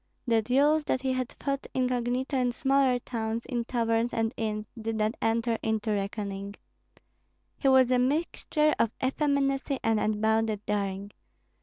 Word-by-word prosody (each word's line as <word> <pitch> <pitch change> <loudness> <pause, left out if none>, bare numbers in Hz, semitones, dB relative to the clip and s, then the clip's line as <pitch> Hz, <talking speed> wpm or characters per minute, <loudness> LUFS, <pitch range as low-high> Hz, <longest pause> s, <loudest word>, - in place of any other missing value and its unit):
The 230 -3 +3
duels 285 +7 +3
that 260 - -1
he 260 -1 +1
had 255 -1 -2
fought 275 -1 -2
incognito 250 +1 0
in 250 -2 +1
smaller 270 -1 +2
towns, 230 -2 -4
in 240 -3 -2
taverns 230 -1 0
and 225 +1 -1
inns, 215 -1 -2
did 225 -1 -3
not 215 +1 0
enter 230 0 +1
into 220 0 -1
reckoning. 200 -1 -3 1.0
He 275 - -1
was 260 -1 +5
a 250 - +4
mixture 305 +2 +1
of 230 - +3
effeminacy 275 0 +1
and 225 -1 +2
unbounded 215 0 0
daring. 200 -1 -2
235 Hz, 145 wpm, -28 LUFS, 220-265 Hz, 1.0 s, was